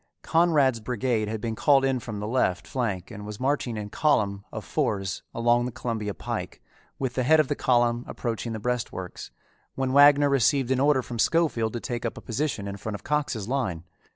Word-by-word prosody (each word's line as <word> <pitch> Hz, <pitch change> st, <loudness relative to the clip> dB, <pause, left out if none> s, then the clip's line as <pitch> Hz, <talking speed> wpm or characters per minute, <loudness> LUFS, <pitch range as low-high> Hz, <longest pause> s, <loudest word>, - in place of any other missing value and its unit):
Conrad's 150 Hz, -7 st, +3 dB
brigade 115 Hz, -1 st, -1 dB
had 110 Hz, +1 st, -3 dB
been 115 Hz, -1 st, -2 dB
called 135 Hz, +3 st, +4 dB
in 135 Hz, -1 st, +1 dB
from 110 Hz, -3 st, -6 dB
the 105 Hz, -, -4 dB
left 110 Hz, -6 st, 0 dB
flank 105 Hz, -8 st, -3 dB
and 105 Hz, -, -8 dB
was 105 Hz, 0 st, -7 dB
marching 130 Hz, -3 st, -1 dB
in 105 Hz, -1 st, -5 dB
column 100 Hz, -10 st, +1 dB
of -, -, -6 dB
fours 95 Hz, -3 st, -1 dB
along 120 Hz, +1 st, +2 dB
the -, -, -5 dB
Columbia 110 Hz, -4 st, -3 dB
Pike, -, -, -5 dB, 0.4 s
with 130 Hz, -2 st, -2 dB
the 130 Hz, -, 0 dB
head 155 Hz, +5 st, +5 dB
of 150 Hz, -, +2 dB
the -, -, 0 dB
column 120 Hz, -1 st, +2 dB
approaching 115 Hz, -1 st, -4 dB
the 110 Hz, -, -4 dB
breastworks, 110 Hz, -6 st, -4 dB, 0.5 s
when 130 Hz, -1 st, -1 dB
Wagner 145 Hz, 0 st, +7 dB
received 135 Hz, -1 st, +2 dB
an 130 Hz, -, +2 dB
order 140 Hz, -1 st, +3 dB
from 120 Hz, -1 st, -7 dB
Schofield 135 Hz, -8 st, +2 dB
to 120 Hz, -, -3 dB
take 120 Hz, 0 st, -4 dB
up 115 Hz, -, -3 dB
a -, -, -8 dB
position 115 Hz, -4 st, -2 dB
in 100 Hz, 0 st, -5 dB
front 105 Hz, +1 st, -5 dB
of 105 Hz, -, -9 dB
Cox's 140 Hz, -8 st, -1 dB
line. 115 Hz, -11 st, -2 dB
120 Hz, 200 wpm, -26 LUFS, 105-135 Hz, 0.5 s, Wagner